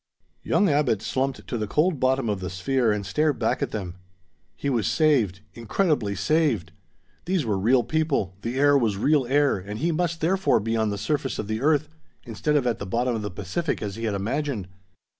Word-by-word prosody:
Young 205 Hz, -, +2 dB
Abbot 140 Hz, -, +1 dB
slumped 135 Hz, 0 st, -2 dB
to 120 Hz, -, -3 dB
the 105 Hz, -, -2 dB
cold 155 Hz, -, +1 dB
bottom 130 Hz, -1 st, +1 dB
of 105 Hz, -3 st, -1 dB
the 90 Hz, -1 st, -4 dB
sphere 110 Hz, +7 st, +1 dB
and 105 Hz, -1 st, -2 dB
stared 150 Hz, +8 st, +1 dB
back 110 Hz, -, 0 dB
at -, -, 0 dB
them. 90 Hz, -4 st, -5 dB, 0.6 s
He -, -, -4 dB
was 120 Hz, -7 st, +1 dB
saved; 125 Hz, -, +2 dB
incredibly 115 Hz, -, 0 dB
saved! 115 Hz, -, +1 dB, 0.5 s
These 180 Hz, -5 st, 0 dB
were 105 Hz, -3 st, 0 dB
real 120 Hz, +6 st, +3 dB
people, 135 Hz, -, -1 dB
the 120 Hz, +4 st, -3 dB
air 145 Hz, +1 st, +5 dB
was 115 Hz, -7 st, +2 dB
real 140 Hz, +3 st, +2 dB
air 145 Hz, -2 st, +3 dB
and 100 Hz, +3 st, -7 dB
he 170 Hz, +8 st, 0 dB
must 170 Hz, 0 st, -1 dB
therefore 190 Hz, +4 st, +2 dB
be 115 Hz, +2 st, -2 dB
on 110 Hz, -1 st, +1 dB
the 100 Hz, -, -3 dB
surface 135 Hz, +6 st, -2 dB
of 105 Hz, -, -4 dB
the 110 Hz, +1 st, -2 dB
earth, 150 Hz, +1 st, +2 dB, 0.4 s
instead 120 Hz, +6 st, -1 dB
of 140 Hz, -4 st, +2 dB
at 120 Hz, -2 st, 0 dB
the 100 Hz, -, -5 dB
bottom 120 Hz, +5 st, 0 dB
of 110 Hz, -, -3 dB
the 105 Hz, -, -3 dB
Pacific 165 Hz, -, -3 dB
as 100 Hz, -2 st, -4 dB
he 115 Hz, +1 st, -4 dB
had 105 Hz, -2 st, -1 dB
imagined! 115 Hz, 0 st, -2 dB
120 Hz, 205 wpm, -25 LUFS, 105-150 Hz, 0.6 s, air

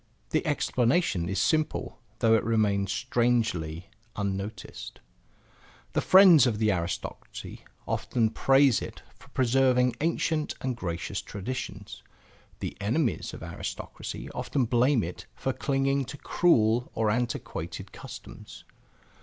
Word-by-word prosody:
The 155 Hz, -, +1 dB
explanation 125 Hz, -, +1 dB
is 100 Hz, -, -2 dB
simple 155 Hz, -, 0 dB, 0.2 s
though 115 Hz, -1 st, +3 dB
it 110 Hz, -, +3 dB
remains 105 Hz, -4 st, +1 dB
strangely 100 Hz, -6 st, 0 dB, 0.2 s
unnoticed. 100 Hz, +1 st, -5 dB, 0.9 s
The -, -, +2 dB
friends 180 Hz, -8 st, +8 dB
of 110 Hz, -3 st, -1 dB
aristocracy 95 Hz, -6 st, -3 dB, 0.2 s
often 115 Hz, -3 st, 0 dB
praise 135 Hz, 0 st, +4 dB
it -, -, -8 dB
for -, -, -19 dB
preserving 125 Hz, -1 st, +2 dB
ancient 160 Hz, -1 st, 0 dB
and 130 Hz, -1 st, -2 dB
gracious 90 Hz, -1 st, -4 dB
traditions. 105 Hz, -1 st, -6 dB, 0.6 s
The -, -, -4 dB
enemies 120 Hz, +6 st, 0 dB
of -, -, -9 dB
aristocracy -, -, -6 dB
often 135 Hz, -4 st, -1 dB
blame 120 Hz, +1 st, +3 dB
it 90 Hz, +5 st, -7 dB
for 135 Hz, -, -2 dB
clinging 135 Hz, 0 st, 0 dB
to 140 Hz, +3 st, -8 dB
cruel 120 Hz, -10 st, +2 dB
or 110 Hz, -1 st, +2 dB
antiquated 120 Hz, +1 st, -3 dB
customs. -, -, -11 dB
120 Hz, 110 wpm, -28 LUFS, 105-135 Hz, 0.9 s, friends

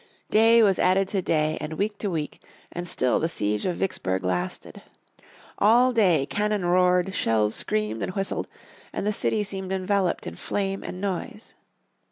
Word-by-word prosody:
Day 225 Hz, +1 st, +6 dB
was 195 Hz, -3 st, +3 dB
added 190 Hz, +1 st, +3 dB
to 195 Hz, -, -1 dB
day, 155 Hz, -3 st, 0 dB
and 155 Hz, -, -5 dB
week 205 Hz, +5 st, -2 dB
to 205 Hz, -, -2 dB
week, 155 Hz, -4 st, -4 dB, 0.3 s
and 175 Hz, 0 st, -5 dB
still 130 Hz, -6 st, +1 dB
the 165 Hz, -, 0 dB
siege 105 Hz, -, -1 dB
of 180 Hz, -, -1 dB
Vicksburg 95 Hz, -, -2 dB
lasted. 90 Hz, -1 st, -3 dB, 0.8 s
All 245 Hz, +4 st, +5 dB
day 180 Hz, -, +3 dB
cannon 210 Hz, +3 st, -1 dB
roared, 180 Hz, +1 st, +3 dB
shells 110 Hz, -6 st, +1 dB
screamed 105 Hz, +1 st, -2 dB
and 185 Hz, -, -4 dB
whistled, 195 Hz, -1 st, -2 dB, 0.4 s
and -, -, -4 dB
the 210 Hz, -, +1 dB
city 210 Hz, +1 st, 0 dB
seemed 190 Hz, -2 st, -6 dB
enveloped 190 Hz, -1 st, 0 dB
in 85 Hz, -, -7 dB
flame 195 Hz, -1 st, -2 dB
and 180 Hz, -, -6 dB
noise. 205 Hz, +4 st, -5 dB
185 Hz, 165 wpm, -25 LUFS, 155-205 Hz, 0.8 s, Day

